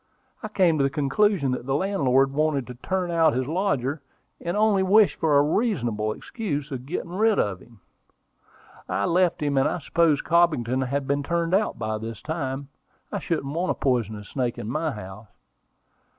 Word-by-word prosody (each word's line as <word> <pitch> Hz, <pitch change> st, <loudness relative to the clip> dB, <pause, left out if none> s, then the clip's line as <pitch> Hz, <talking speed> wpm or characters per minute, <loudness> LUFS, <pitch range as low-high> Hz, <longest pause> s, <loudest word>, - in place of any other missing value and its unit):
I 215 Hz, -, -4 dB
came 180 Hz, -7 st, +2 dB
to -, -, +3 dB
the 135 Hz, -, +2 dB
conclusion 150 Hz, +2 st, +1 dB
that 125 Hz, 0 st, -4 dB
the 135 Hz, -, +1 dB
landlord 135 Hz, -7 st, +2 dB
wanted 150 Hz, -3 st, +1 dB
to 125 Hz, -, -8 dB
turn 180 Hz, +8 st, -2 dB
out 165 Hz, -2 st, +3 dB
his 130 Hz, +1 st, -1 dB
lodger, 150 Hz, -4 st, -1 dB, 0.4 s
and 175 Hz, +4 st, -3 dB
only 210 Hz, -2 st, +3 dB
wished 200 Hz, +2 st, +4 dB
for 155 Hz, -3 st, +3 dB
a 140 Hz, -, +5 dB
reasonable 120 Hz, -, 0 dB
excuse 150 Hz, -, -4 dB
for 135 Hz, -4 st, -4 dB
getting 165 Hz, +6 st, -5 dB
rid 215 Hz, +3 st, +2 dB
of 95 Hz, -3 st, 0 dB
him. 115 Hz, -2 st, -19 dB, 1.1 s
I 100 Hz, -, 0 dB
left 175 Hz, -2 st, +2 dB
him; 140 Hz, -2 st, +1 dB
and 135 Hz, -, +3 dB
I -, -, -2 dB
suppose 165 Hz, -2 st, +1 dB
Cobbington 130 Hz, -7 st, +2 dB
has 140 Hz, +2 st, -1 dB
been 140 Hz, +1 st, 0 dB
turned 170 Hz, +3 st, -1 dB
out 205 Hz, +3 st, +1 dB
by 110 Hz, -1 st, -3 dB
this 115 Hz, -1 st, -6 dB
time. 140 Hz, -3 st, -4 dB, 0.4 s
I -, -, -2 dB
shouldn't 145 Hz, -4 st, -2 dB
want 175 Hz, +3 st, -1 dB
a -, -, +1 dB
poisonous 110 Hz, -6 st, -1 dB
snake 125 Hz, -3 st, -2 dB
in -, -, -6 dB
my 155 Hz, +7 st, -1 dB
house." 105 Hz, -1 st, -9 dB
145 Hz, 180 wpm, -25 LUFS, 125-175 Hz, 1.1 s, a